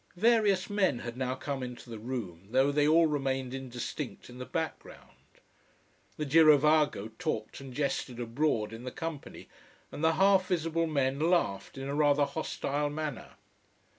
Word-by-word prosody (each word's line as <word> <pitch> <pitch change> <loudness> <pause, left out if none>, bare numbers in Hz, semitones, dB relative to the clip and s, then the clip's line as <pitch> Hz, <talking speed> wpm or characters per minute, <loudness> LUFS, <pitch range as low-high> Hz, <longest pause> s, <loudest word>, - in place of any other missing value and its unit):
Various 210 -3 +3
men 195 - +1
had 120 0 -6
now 130 0 -2
come 140 0 -4
into 125 -1 -7
the 115 -2 -7
room, 105 -7 -6
though 130 +4 +3
they 145 0 +2
all 165 +2 +5
remained 135 -4 -1
indistinct 125 -2 -6
in 125 - -11
the 125 - -6
background. 160 +5 -5 1.1
The 150 - -2
girovago 150 -6 +4
talked 110 +4 -3
and 135 -1 -9
jested 130 -2 -2
abroad 115 -2 0
in 115 +2 -8
the 125 - -4
company, 160 +1 -7 0.4
and 150 - -6
the 160 0 +4
half 190 +1 +4
visible 165 -2 0
men 140 -3 0
laughed 155 - 0
in 135 0 -5
a 140 - -3
rather 145 -1 +3
hostile 145 -1 -2
manner. 150 -3 -5
140 Hz, 155 wpm, -30 LUFS, 125-160 Hz, 1.1 s, all